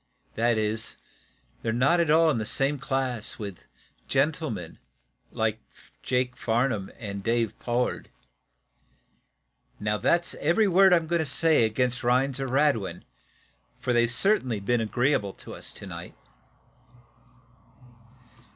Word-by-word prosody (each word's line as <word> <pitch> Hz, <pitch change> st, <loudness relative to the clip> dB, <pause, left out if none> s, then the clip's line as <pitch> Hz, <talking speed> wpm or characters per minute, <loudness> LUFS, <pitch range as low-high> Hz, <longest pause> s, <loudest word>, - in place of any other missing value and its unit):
That 115 Hz, 0 st, +1 dB
is, 110 Hz, +1 st, -1 dB, 0.7 s
they're 115 Hz, -, -1 dB
not 135 Hz, +9 st, +3 dB
at 170 Hz, -2 st, +1 dB
all 160 Hz, +1 st, +5 dB
in 125 Hz, -, -1 dB
the -, -, -2 dB
same 140 Hz, +1 st, +2 dB
class 130 Hz, -4 st, -2 dB
with 100 Hz, -4 st, -8 dB, 0.4 s
gentlemen 135 Hz, -, -1 dB, 0.5 s
like -, -, -1 dB, 0.4 s
Jake 125 Hz, 0 st, -1 dB
Farnum 115 Hz, -4 st, 0 dB
and 100 Hz, -4 st, -6 dB
Dave 115 Hz, 0 st, 0 dB
Pollard. 120 Hz, +1 st, -2 dB, 1.7 s
Now, 105 Hz, +1 st, -1 dB
that's 170 Hz, 0 st, +1 dB
every 175 Hz, +8 st, +3 dB
word 190 Hz, +1 st, +5 dB
I'm 170 Hz, -2 st, +4 dB
going 170 Hz, +1 st, 0 dB
to 160 Hz, -, 0 dB
say 160 Hz, -7 st, +3 dB
against 125 Hz, +3 st, -1 dB
Rhinds 130 Hz, +2 st, +1 dB
or 135 Hz, -, -2 dB
Radwin, 135 Hz, -6 st, +1 dB, 0.8 s
for 125 Hz, -1 st, -1 dB
they've 120 Hz, 0 st, +3 dB
certainly 130 Hz, -, +1 dB
been 115 Hz, +4 st, 0 dB
agreeable 115 Hz, -2 st, 0 dB
to -, -, -11 dB
us -, -, -7 dB
to -, -, -8 dB
night." -, -, -8 dB
125 Hz, 125 wpm, -26 LUFS, 110-150 Hz, 1.7 s, all